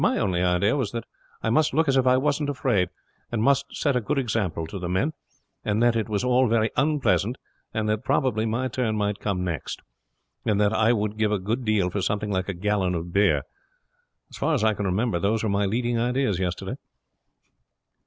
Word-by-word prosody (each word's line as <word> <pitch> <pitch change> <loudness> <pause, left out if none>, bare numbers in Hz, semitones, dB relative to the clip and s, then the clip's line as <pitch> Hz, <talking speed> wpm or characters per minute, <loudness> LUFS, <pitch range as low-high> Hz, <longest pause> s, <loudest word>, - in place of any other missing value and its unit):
"My - - +3
only 90 -3 0
idea 90 +6 +2
was 125 -7 -2
that 115 -2 -3 0.4
I 110 - +1
must 150 +2 +2
look 160 +1 +3
as 135 - +3
if 130 -1 +3
I 125 0 +5
wasn't 145 +1 0
afraid, 100 -9 +1 0.4
and 120 - -1
must 140 +2 +3
set 140 -3 +1
a 125 - +2
good 140 +7 -1
example 105 -10 -1
to 95 +5 -7
the 90 -1 -4
men, 115 - 0 0.5
and 105 +1 0
that 120 -1 +4
it 115 -1 -1
was 105 0 -1
all 125 +1 +3
very 110 -1 +2
unpleasant, 130 - +1 0.4
and 110 -2 -1
that 105 0 0
probably 115 -5 +1
my 120 +4 -1
turn 115 -3 -1
might 105 -1 -1
come 95 -3 -2
next, 85 -6 -4 0.6
and 105 -2 +1
that 105 0 +3
I 110 +1 +3
would 105 -2 -1
give 105 -1 +2
a 105 - +2
good 110 +7 -2
deal 105 -4 +1
for 100 - -2
something 105 +2 -1
like 95 0 -1
a 95 - -3
gallon 95 -1 0
of 85 +1 -5
beer. 100 +1 +3 0.9
As - - -10
far 165 - +1
as 120 - 0
I 110 0 +4
can 105 0 -3
remember 95 0 0
those 105 +4 0
were 110 - 0
my 100 0 +1
leading 120 +3 0
ideas 120 -5 0
yesterday." 90 -2 -3
110 Hz, 215 wpm, -25 LUFS, 100-125 Hz, 0.9 s, I